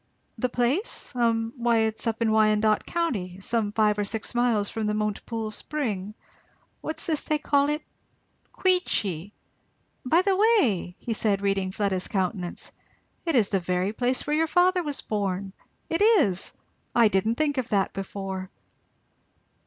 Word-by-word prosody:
"The 250 - 0
place? 250 - -1
Hum 230 -2 0
why 235 -1 +2
it's 220 +1 0
up 225 +1 0
in 220 - +2
Wyandot 215 0 +3
County 205 - -2
some 210 +1 0
five 210 -1 +2
or - - +2
six 220 +4 -4
miles 240 -4 +2
from 220 0 -3
the 210 - 0
Montepoole 215 +1 -3
Spring 215 -7 -3 0.7
what's 315 - -2
this 315 -3 0
they 305 - 0
call 285 -1 +2
it? 300 +1 -2 0.7
Queechy! 205 - 0 0.7
By 325 +8 +3
the 390 -1 +2
way!" 370 - +2 0.2
said 210 -2 +1
he, - - -9
reading 195 -1 0
Fleda's 190 -2 0
countenance, 185 -2 -3 0.5
"it 330 -3 0
is 220 -5 +3
the 195 - +1
very 180 +3 -1
place 250 +2 0
where 295 - 0
your 325 +1 +2
father 360 +2 +3
was 295 -4 -3
born! 195 -2 -2 0.3
it 330 +4 -1
is! 335 - +4 0.4
I 235 -2 +6
didn't 210 +3 +1
think 290 0 0
of 250 - -3
that 200 -2 +1
before." 195 -1 -5
220 Hz, 155 wpm, -26 LUFS, 200-285 Hz, 0.7 s, I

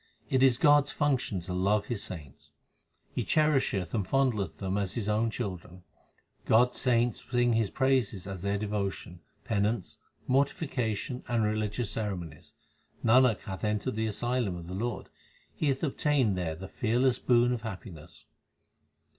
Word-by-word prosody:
It 130 - +3
is 130 -3 +5
God 145 -1 +5
s - - -3
function 130 - 0
to 90 +2 -5
love 100 +3 +1
His 120 -5 -3
saints; 75 -7 -8 0.6
He - - -1
cherisheth 135 - +1
and 105 - +1
fondleth 110 -6 0
them 95 -1 -2
as 100 -2 -1
His 110 -4 -2
own 110 +2 +1
children. 90 -5 -6 0.6
God 125 +3 +5
s - - -3
saints 120 -2 +2
sing 120 -1 +2
His 110 -3 +1
praises 130 -8 +1
as 95 -2 -6
their 100 +1 0
devotion, 100 -4 -3 0.2
penance, 105 -1 -1 0.3
mortification, 130 -4 -1
and 120 -2 +1
religious 105 +1 -1
ceremonies. 90 -8 -5 0.5
Nanak 120 -1 +5
hath 95 -2 -7
entered 105 +3 -1
the 110 0 0
asylum 120 -2 -1
of 85 -1 -8
the 90 - -7
Lord; 115 +4 -3 0.5
he 155 - -1
hath 135 +1 0
obtained 140 -7 +1
there 85 -3 -2
the 95 +4 -8
fearless 125 +4 +1
boon 120 0 +3
of 120 - -3
happiness. 95 -7 -9
110 Hz, 155 wpm, -29 LUFS, 95-125 Hz, 0.6 s, is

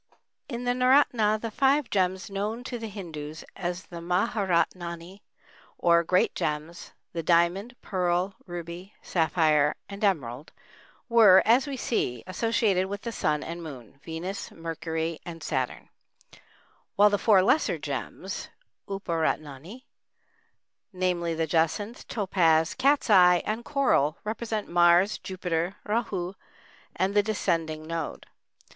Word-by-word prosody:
] - - -52
In 240 - -5
the 245 - +1
naoratna 250 -4 +3
the 230 0 -5
five 275 +3 +2
gems 185 -1 0
known 210 +5 -3
to 245 -1 -5
the 225 - -5
Hindus 160 -7 -7
as 180 -1 -4
the 170 - -9
mahâratnâni, 180 -1 -1 0.6
or 170 -1 +4
"great 180 +2 +2
gems,"—the 160 +2 -5
diamond, 175 +8 +2
pearl, 180 0 0
ruby, 175 +2 -8
sapphire, 155 -3 +2
and 200 +1 -8
emerald,—were, 185 - +2
as 250 +5 +4
we 275 -2 -4
see, 125 - -1
associated 195 -1 +1
with 200 +1 -6
the 235 - -3
Sun 150 -8 -1
and 170 +1 -6
Moon, 135 -5 -10
Venus, 175 +5 -5
Mercury, 165 0 -4
and 165 -2 -8
Saturn, 130 -5 -3 1.1
while 205 +1 +6
the 205 - +1
four 195 -3 +5
lesser 295 +11 +2
gems - - -5 0.4
(uparatnâni)—namely, 175 - -5
the 160 0 0
jacinth, 165 +8 -1
topaz, 165 -6 +2
cat's 275 +2 +2
eye, 180 -3 +6
and 220 +2 -2
coral—represent 220 - 0
Mars, 175 +4 +4
Jupiter, 180 -1 -3
Râhu, 195 -5 -1 0.6
and 190 +1 0
the 205 - +5
descending 165 -7 -1
node. 165 -1 -5
180 Hz, 115 wpm, -27 LUFS, 165-210 Hz, 1.1 s, while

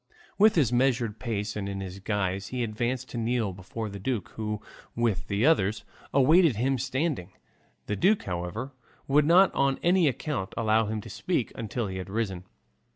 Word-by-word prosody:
With 215 +1 +6
this 140 -8 +3
measured 120 -3 +1
pace 105 -4 -3
and 100 -1 -3
in 100 - -4
this 95 0 -6
guise 95 -1 -2
he 125 +2 -2
advanced 120 +3 -2
to 120 - -4
kneel 115 -3 0
before 95 +5 -6
the 100 -1 -7
duke, 110 -1 -2
who, 105 -1 -4 0.4
with 115 -5 0
the 100 +4 +1
others, 105 -10 +2 0.3
awaited 155 - +5
him 130 +4 0
standing. 130 - -2 0.5
The 105 - -2
duke, 200 - +3
however, 90 +8 -4 0.4
would 145 +2 +4
not 185 +4 +6
on 135 -1 +2
any 175 -1 +4
account 130 -6 -2
allow 110 -1 +2
him 110 0 -3
to - - -11
speak - - -1
until 115 +1 -3
he 95 -2 -5
had 95 0 -6
risen. 95 -4 -2
115 Hz, 175 wpm, -27 LUFS, 100-135 Hz, 0.5 s, With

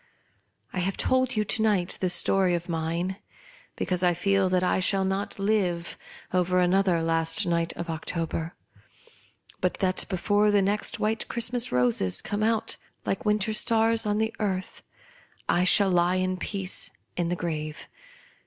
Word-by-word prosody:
I 185 - -2
have 185 +2 -2
told 260 -1 +1
you 215 - +1
to 220 +2 -2
night 200 -5 +1
this 180 -2 +1
story 190 -2 +2
of 170 0 -5
mine, 170 +3 -2 0.6
because 180 -1 -2
I 175 -1 +2
feel 195 +1 +1
that 185 0 +1
I 180 - +1
shall 190 +1 +1
not 195 +1 -3
live 195 -4 -1 0.4
over 180 0 +2
another 180 -1 +2
last 165 0 +3
night 170 -1 0
of 170 - -6
October, 165 0 -4 1.0
but 185 -2 0
before 205 +3 +2
the 205 -1 +3
next 205 +2 -1
white 220 +1 -1
Christmas 235 +1 +1
roses 120 -7 +3
come 205 +1 -3
out 220 0 0 0.3
like 195 - -2
winter 210 +1 +1
stars 225 +1 +3
on 210 0 0
the 220 +1 -1
earth, 190 -3 -3 0.7
I 180 - +2
shall 195 0 +4
b<^ 185 +1 +1
at 185 - -7
peace 195 0 -2 0.3
in 175 -1 -1
the 175 - 0
gi'ave. 155 -3 -4
185 Hz, 155 wpm, -26 LUFS, 175-210 Hz, 1.0 s, shall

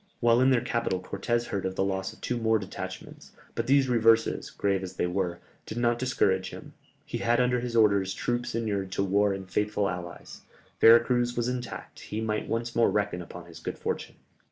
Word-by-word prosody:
While 120 0 +4
in 130 - +5
their 125 -3 +3
capital 115 -5 -1
Cortès 115 +6 -2
heard 100 - -2
of 95 0 -3
the - - +1
loss 95 0 -2
of - - -17
two 125 - -2
more 110 -1 +3
detachments, 95 -2 -8 0.2
but - - -2
these 135 0 +4
reverses, 115 -2 +3
grave 100 -1 0
as 95 -1 -7
they - - 0
were, 90 -1 -1 0.3
did 110 - -6
not 120 0 +2
discourage 95 -7 +1
him; - - -10 0.3
he - - -4
had 120 +1 +2
under 125 0 +2
his 120 -1 -4
orders 100 -4 +3
troops 120 -1 -2
inured 100 -4 -2
to - - 0
war 100 +1 +2
and 95 -1 -5
faithful 105 +1 0
allies, 90 -2 -7 0.4
Vera 115 +1 +8
Cruz 120 -1 0
was 120 0 0
intact, 125 -1 -5
he 105 - -5
might 110 -1 -2
once 115 +1 -2
more 115 - +4
reckon 105 -4 -1
upon 90 0 -10
his 85 -1 -12
good - - -5
fortune. - - -4
110 Hz, 205 wpm, -28 LUFS, 95-120 Hz, 0.4 s, Vera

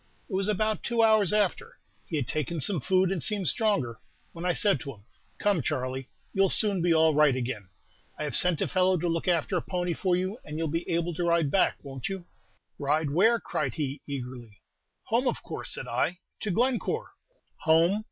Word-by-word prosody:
It 215 - -10
was 195 +1 +1
about 215 +1 0
two 235 -1 +1
hours 215 -4 +4
after, 210 -3 0 0.3
he 165 - -4
had 140 -6 -1
taken 155 +2 -2
some 180 +4 0
food 185 +4 +2
and 185 -4 -2
seemed 205 -1 -1
stronger, 200 - 0 0.3
when 170 +1 -7
I 180 - +2
said 200 +3 +3
to 140 -3 -7
him, 100 0 -23 0.3
'Come, 205 -5 +1
Charley, 130 +1 -3 0.2
you 195 - +3
'll 195 - +3
soon 200 -4 +6
be 175 0 +2
all 160 -1 +4
right 150 -3 +4
again; 120 -7 -4 0.5
I - - -4
have 145 -4 -2
sent 180 -3 +4
a - - -1
fellow 185 0 +2
to 175 - -2
look 165 +1 -2
after 175 +1 +1
a - - -1
pony 180 -2 -2
for 180 +1 0
you, 185 +6 -3
and 150 0 -7
you 165 - -1
'll - - -2
be 165 +2 -3
able 170 0 0
to 175 - -3
ride 170 -4 +2
back, 190 - +2
won't 135 0 -6
you?' 190 -3 -6 0.5
"'Ride 145 +1 0
where?' 220 +9 +4
cried - - -3
he, 145 -3 -3
eagerly. 125 -6 -7 0.5
"'Home, - - 0
of - - -2
course,' - - -3
said - - -6
I, 175 +2 -1 0.2
'to 215 - -3
Glencore.' 255 - 0 0.5
"'Home! 165 +5 +3
170 Hz, 210 wpm, -27 LUFS, 150-195 Hz, 0.5 s, soon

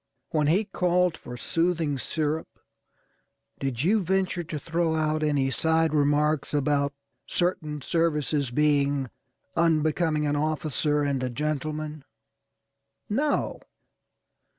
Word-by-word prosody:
When 150 -2 +2
he 190 +8 +3
called 180 -3 +1
for 125 0 -9
soothing 165 0 0
syrup, 155 +3 -1 1.1
did 135 -2 -2
you 210 +5 +3
venture 185 -1 0
to 155 -1 -5
throw 165 +2 0
out 155 0 0
any 145 -3 +1
side 160 +2 +2
remarks 150 0 +2
about 140 0 +1 0.4
certain 155 -5 -1
services 150 -4 0
being 140 -2 +1 0.4
unbecoming 155 -1 +2
an 145 0 +1
officer 150 -1 0
and 140 -2 0
a 130 - -1
gentleman? 150 +2 -3 1.1
No. 290 +7 0
155 Hz, 105 wpm, -26 LUFS, 145-165 Hz, 1.1 s, he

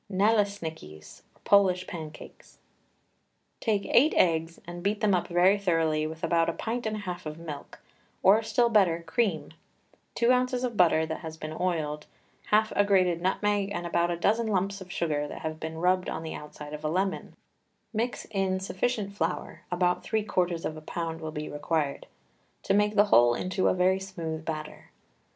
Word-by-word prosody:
NALESNIKIS 185 - -1 0.2
(POLISH 185 -2 +4
PANCAKES). 160 -3 -10 1.0
Take 210 -3 0
eight 300 +6 +4
eggs 165 -1 +2
and 175 0 -7
beat 205 +3 0
them 215 -3 +2
up 180 - +1
very 180 +4 +4
thoroughly 160 -5 +1
with 160 +1 -9
about 165 0 +2
a - - -1
pint 230 +4 -3
and 215 - -2
a - - -4
half 180 -4 -5
of 155 +1 -6
milk, 155 -4 -8 0.5
or 205 +4 +6
still 235 +1 +2
better, 180 -7 +3
cream, 170 -1 -1 0.6
two 235 +1 +3
ounces 250 0 +1
of 245 -3 -2
butter 165 -4 +4
that 160 0 -4
has 160 -1 -8
been 155 0 -6
oiled, 155 -4 -2 0.4
half 215 +1 +3
a 205 - +5
grated 185 -4 +2
nutmeg, 200 +2 +1
and 175 -3 -3
about 170 0 +1
a 170 - -1
dozen 220 +6 +1
lumps 195 -1 -1
of 185 -1 -10
sugar 150 -4 -1
that - - -8
have 155 0 -4
been 160 0 -5
rubbed 180 +2 +1
on - - -4
the 160 - -5
outside 150 0 -9
of 150 0 -7
a 155 - 0
lemon; 190 +4 -2 0.6
mix 235 +3 -2
in 190 -2 0
sufficient 200 +2 -2
flour 175 -3 -3
about 180 0 +1
three 220 -1 0
quarters 180 -5 -1
of 155 - -3
a 155 - -9
pound 165 +1 -4
will 160 - -4
be 150 0 -5
required 145 -1 -2 0.6
to - - +1
make 210 +1 +2
the 205 0 +6
whole 120 0 +6
into 185 +4 0
a - - +4
very 185 +1 +3
smooth 165 -5 -5
batter. 155 -1 -6
180 Hz, 180 wpm, -28 LUFS, 160-205 Hz, 1.0 s, or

